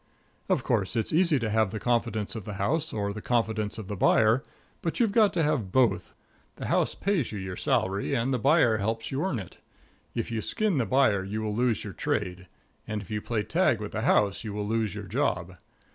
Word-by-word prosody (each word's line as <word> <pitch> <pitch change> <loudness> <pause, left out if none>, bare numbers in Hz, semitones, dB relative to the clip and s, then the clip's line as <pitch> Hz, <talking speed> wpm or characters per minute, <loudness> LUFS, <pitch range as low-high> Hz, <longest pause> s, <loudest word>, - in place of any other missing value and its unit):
Of - - +2
course, 95 +3 0
it's 115 +4 -1
easy 165 -2 +4
to 115 -4 -1
have 110 -2 +2
the 110 +2 -5
confidence 115 -3 -1
of 110 - -5
the 105 - -6
house, 150 +12 0
or 100 -1 -2
the 105 - -7
confidence 110 -3 0
of 110 -4 -7
the 105 - -4
buyer, 110 +6 +4 0.4
but 165 - -2
you've 230 -4 +3
got 215 -1 +4
to 165 - +1
have 140 -11 0
both. 130 0 +2 0.4
The - - -6
house - - +1
pays 190 - 0
you 105 - -5
your 95 -1 -5
salary, 95 +2 0
and 125 +3 0
the 125 - 0
buyer 110 +1 +4
helps 110 +2 -2
you 135 +4 -1
earn 185 -9 -1
it. 95 -5 -9 0.6
If 115 0 -2
you 115 -1 -1
skin 210 - 0
the 115 - 0
buyer 110 -5 +3
you 105 +3 -4
will 105 -1 -2
lose 120 -1 +1
your 100 - -6
trade; 95 -11 -2 0.4
and 105 -1 -3
if 100 - -13
you 105 0 -2
play 110 -2 -1
tag 160 - +2
with 105 -1 -5
the 110 - -3
house 105 -2 +2
you 105 -2 -5
will 105 0 -3
lose 110 -3 0
your 105 -1 -6
job. 90 -6 -1
110 Hz, 220 wpm, -27 LUFS, 105-130 Hz, 0.6 s, easy